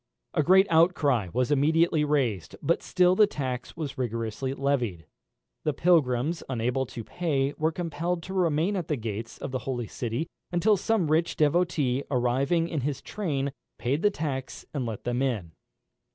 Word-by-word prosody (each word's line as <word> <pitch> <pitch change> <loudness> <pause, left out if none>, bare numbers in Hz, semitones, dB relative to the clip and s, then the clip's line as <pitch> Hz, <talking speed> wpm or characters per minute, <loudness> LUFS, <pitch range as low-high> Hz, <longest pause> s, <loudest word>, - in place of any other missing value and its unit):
A - - +3
great 190 +5 +6
outcry 155 - +3
was 125 +3 0
immediately 155 +2 +3
raised, 130 - 0
but - - +2
still 180 0 +3
the 210 +1 +6
tax 130 -2 -4
was 150 -5 -5
rigorously 115 +2 -2
levied. 125 - -1 0.6
The 150 - +1
pilgrims 160 -2 +2
unable 125 +1 0
to 115 - -7
pay 145 -2 -1
were 160 +1 +1
compelled 170 +1 -2
to 190 - -7
remain 175 +1 +1
at 180 -5 -2
the 150 - 0
gate 115 -2 -5
of - - -4
the 130 - -2
holy 120 -3 -2
city 120 +6 -3 0.3
until 185 +5 +3
some 195 -5 0
rich 165 +2 +2
devotee 150 -4 +2
arriving 135 +6 +1
with 155 -4 -1
his 140 +1 -3
train, 140 -9 -2 0.3
paid 135 +5 -1
the 210 - +5
tax 140 -8 -4
and 135 -5 -2
let 110 -3 -5
them 120 +1 -1
in. 110 -11 -1
145 Hz, 165 wpm, -27 LUFS, 125-170 Hz, 0.6 s, great